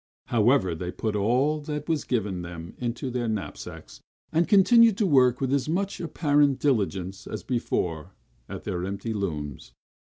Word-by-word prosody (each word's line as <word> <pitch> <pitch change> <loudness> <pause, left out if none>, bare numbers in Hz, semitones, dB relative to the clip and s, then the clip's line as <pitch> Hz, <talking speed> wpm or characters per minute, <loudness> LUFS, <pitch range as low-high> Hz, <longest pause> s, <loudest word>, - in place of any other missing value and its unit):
However, 115 -5 +3
they 90 +2 -4
put 110 +2 -3
all 125 +9 +2
that 150 0 -5
was 160 -3 0
given 105 -7 -1
them 85 0 -8
into 125 +1 -3
their 120 -1 -2
knapsacks; 110 -3 -6 0.3
and 165 +1 +2
continued 225 +2 +6
to 215 - +2
work 130 -7 +4
with 135 0 0
as 140 +1 0
much 195 +4 -1
apparent 145 -4 +2
diligence 100 -8 -1
as - - -6
before 90 - -2 0.3
at - - -7
their 90 0 -3
empty 100 +4 -3
looms. 75 - -4
120 Hz, 155 wpm, -26 LUFS, 95-145 Hz, 0.3 s, continued